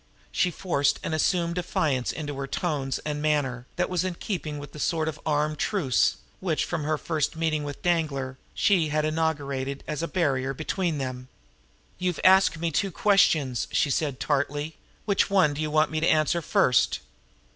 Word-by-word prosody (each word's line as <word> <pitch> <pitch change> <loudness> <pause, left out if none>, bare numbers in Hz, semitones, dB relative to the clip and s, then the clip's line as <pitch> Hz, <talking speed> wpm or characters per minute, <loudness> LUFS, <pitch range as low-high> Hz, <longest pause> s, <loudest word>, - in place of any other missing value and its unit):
She 180 - +2
forced 145 -6 0
an - - -2
assumed 170 +2 +1
defiance 155 -7 0
into 145 -2 -5
her 135 0 -3
tones 140 -5 -2
and 150 -1 -2
manner, 135 -5 0
that - - 0
was 180 -1 0
in 185 -2 -2
keeping 160 -6 -4
with 145 0 -8
the 150 - -10
sort 160 +1 0
of 155 -1 -4
armed 150 0 0
truce, 160 - +2 0.2
which, 170 -5 0
from 170 -4 -3
her 155 0 +1
first 160 0 -1
meeting 160 -2 0
with 145 -1 -7
Danglar, 140 -7 0 0.2
she 180 -6 +3
had 150 0 0
inaugurated 140 -4 -1
as 150 0 -3
a 165 - -1
barrier 135 -7 0
between 165 +2 -1
them. 130 -2 -4 0.7
"You 180 - +1
have 175 - -4
asked 190 -3 +6
me 165 +1 -1
two 195 +6 +1
questions," 160 - +3
she 145 - +2
said 140 -2 -1
tartly. 145 +2 -1 0.3
"Which 200 -2 +2
one 185 -7 +4
do 145 - -4
you 155 - -1
want 155 0 +2
me 155 - 0
to 165 - +1
answer 155 +2 +2
first?" 125 -5 +2
155 Hz, 180 wpm, -26 LUFS, 140-170 Hz, 0.7 s, asked